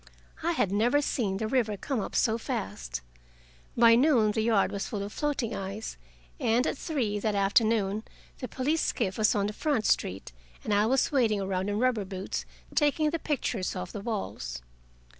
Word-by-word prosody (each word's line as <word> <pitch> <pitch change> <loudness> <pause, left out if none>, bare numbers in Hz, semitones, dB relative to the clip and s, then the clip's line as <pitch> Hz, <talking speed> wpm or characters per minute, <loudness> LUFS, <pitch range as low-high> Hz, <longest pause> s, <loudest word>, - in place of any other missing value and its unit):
I 340 +2 +1
had 205 - +1
never 235 +8 +3
seen 220 -9 -1
the 220 - -2
river 220 -4 +1
come 265 +4 -2
up 195 - -4
so 225 0 +2
fast. 65 - -4 0.8
By 230 0 +7
noon 240 -4 +4
the 220 +1 0
yard 220 -3 +2
was 200 - -3
full 205 -3 -3
of 205 - -6
floating 280 -7 -1
ice, 195 +3 -5 0.4
and 235 +3 +2
at - - 0
three 255 -10 -1
that 210 0 0
afternoon 205 0 +2 0.4
the 255 - -4
police 295 +7 0
skiff 195 -3 -1
was 215 +2 +4
on 200 -1 +1
the 210 - -2
front 275 -4 0
street, 95 -7 0 0.3
and 210 - -1
I 205 +1 +3
was 265 +2 +2
wading 225 -7 +2
around 190 0 -1
in 205 - -1
rubber 240 -3 +2
boots, 190 0 -5 0.3
taking 300 +1 +2
the 330 - -1
pictures 245 -12 -2
off 180 -1 -5
the 205 - -6
walls. 60 - -4
220 Hz, 180 wpm, -28 LUFS, 200-255 Hz, 0.8 s, By